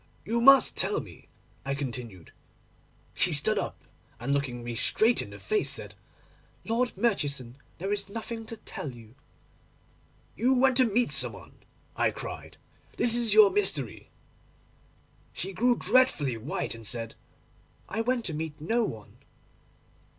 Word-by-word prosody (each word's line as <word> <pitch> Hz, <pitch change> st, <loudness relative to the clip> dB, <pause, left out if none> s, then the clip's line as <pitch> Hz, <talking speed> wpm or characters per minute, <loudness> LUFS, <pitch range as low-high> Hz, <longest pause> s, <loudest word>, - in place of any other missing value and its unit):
"You 235 Hz, +1 st, -1 dB
must 275 Hz, +2 st, +7 dB
tell -, -, +1 dB
me," -, -, -12 dB, 0.4 s
I 140 Hz, 0 st, -2 dB
continued. 120 Hz, -, -7 dB, 0.8 s
She -, -, +3 dB
stood -, -, +4 dB
up, -, -, -6 dB, 0.4 s
and, 135 Hz, +4 st, -2 dB
looking 130 Hz, -4 st, -2 dB
me 120 Hz, 0 st, -5 dB
straight 220 Hz, -, +3 dB
in -, -, -8 dB
the -, -, -10 dB
face, 430 Hz, -1 st, 0 dB
said, -, -, -2 dB, 0.7 s
"Lord 235 Hz, -1 st, -1 dB
Murchison, 145 Hz, -, -1 dB, 0.2 s
there 195 Hz, +4 st, -2 dB
is 200 Hz, -1 st, -3 dB
nothing 225 Hz, +1 st, -6 dB
to 230 Hz, -, -7 dB
tell 140 Hz, -9 st, -7 dB
you."—"You 135 Hz, -, -7 dB
went 260 Hz, 0 st, +3 dB
to 260 Hz, -, +5 dB
meet 235 Hz, +2 st, +1 dB
some -, -, +4 dB
one," -, -, -13 dB, 0.4 s
I -, -, +2 dB
cried; -, -, -8 dB, 0.4 s
"this 235 Hz, -1 st, +4 dB
is 230 Hz, -3 st, +3 dB
your 210 Hz, -2 st, +8 dB
mystery." 185 Hz, -, -2 dB, 1.2 s
She 195 Hz, +3 st, -4 dB
grew 245 Hz, +4 st, +2 dB
dreadfully 230 Hz, -, +2 dB
white, 115 Hz, +6 st, -4 dB
and 115 Hz, -2 st, -7 dB
said, 115 Hz, -2 st, -3 dB, 0.7 s
"I 220 Hz, -, -2 dB
went 240 Hz, 0 st, -1 dB
to 165 Hz, -, -3 dB
meet 155 Hz, 0 st, -5 dB
no 225 Hz, +10 st, 0 dB
one." 110 Hz, -, -7 dB
195 Hz, 145 wpm, -28 LUFS, -, 1.2 s, your